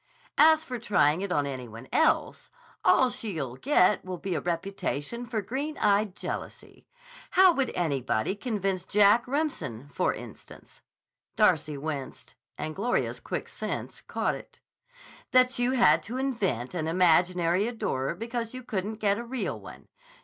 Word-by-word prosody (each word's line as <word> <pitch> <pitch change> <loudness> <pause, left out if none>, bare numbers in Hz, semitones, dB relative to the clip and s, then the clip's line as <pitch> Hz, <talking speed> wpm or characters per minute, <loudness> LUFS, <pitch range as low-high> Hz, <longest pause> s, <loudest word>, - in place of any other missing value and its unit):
As 315 0 +6
for 250 -2 -5
trying 165 -7 +2
it 200 -1 -3
on 145 -5 +1
any 130 -3 -5
one 115 +3 -11
else, 320 - +1 0.3
all 255 -1 +4
she'll 160 - -4
get 210 - +3
will 185 -1 -5
be 185 +2 -3
a - - -1
reputation 195 - -3
for 220 -4 -2
green 285 +8 -4
eyed 205 -2 +2
jealousy. - - -7 0.4
How 375 -1 +6
would 270 -4 0
anybody 140 - 0
convince 195 -4 -2
Jack 210 +5 +4
Remsen, 250 - -3
for - - +1
instance" - - -11 0.5
(Darcy 150 -1 +2
winced, 140 -2 -6 0.2
and 155 0 -4
Gloria's 235 +5 -1
quick - - -4
sense - - -5
caught - - -1
it), - - -11 0.7
"that 255 0 +4
you 245 +1 +2
had 165 -11 +5
to 230 +9 -6
invent 200 - -1
an 160 -3 -2
imaginary 175 +2 +3
adorer 170 - -2
because 230 +3 -4
you 255 - -7
couldn't 210 -1 -3
get 205 -1 +1
a - - -4
real 245 +1 -3
one? - - -12
200 Hz, 150 wpm, -28 LUFS, 160-245 Hz, 0.7 s, As